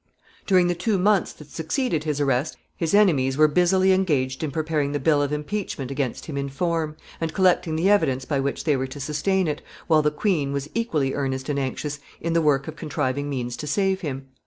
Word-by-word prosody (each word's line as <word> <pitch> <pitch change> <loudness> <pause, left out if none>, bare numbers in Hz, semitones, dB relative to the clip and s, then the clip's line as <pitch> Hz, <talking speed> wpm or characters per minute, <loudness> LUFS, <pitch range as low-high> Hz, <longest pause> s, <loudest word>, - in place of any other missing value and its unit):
] - - -30
During 185 -3 +5
the 175 - +2
two 195 +4 0
months 200 +1 +2
that 150 -1 -15
succeeded 160 - -1
his 150 -2 -1
arrest 140 +1 0 0.2
his 165 +3 0
enemies 140 -11 +3
were 155 0 +6
busily 185 +4 +3
engaged 145 -9 +1
in 155 - -1
preparing 150 -1 -1
the 145 - 0
bill 145 +1 +3
of 145 0 -1
impeachment 150 -3 -3
against 135 -3 -3
him 145 -3 -5
in 140 0 -2
form, 160 +1 -1 0.2
and 160 -1 -3
collecting 180 -3 +3
the 165 +4 +1
evidence 135 -11 +2
by 140 -1 0
which 140 +1 -2
they 150 -3 +2
were 130 0 -1
to 130 +2 -9
sustain 165 +6 0
it, 150 -1 -2 0.2
while 155 -2 +4
the 150 - +2
queen 150 -3 0
was 140 +1 -4
equally 155 - 0
earnest 135 -1 -2
and 140 -1 0
anxious 140 +2 -3 0.2
in 165 0 -2
the 165 - +3
work 140 -3 +2
of 160 - -6
contriving 145 -2 -2
means 125 -3 -3
to 150 - -6
save 190 +4 +1
him. 135 -4 -4
150 Hz, 215 wpm, -24 LUFS, 140-175 Hz, 0.2 s, were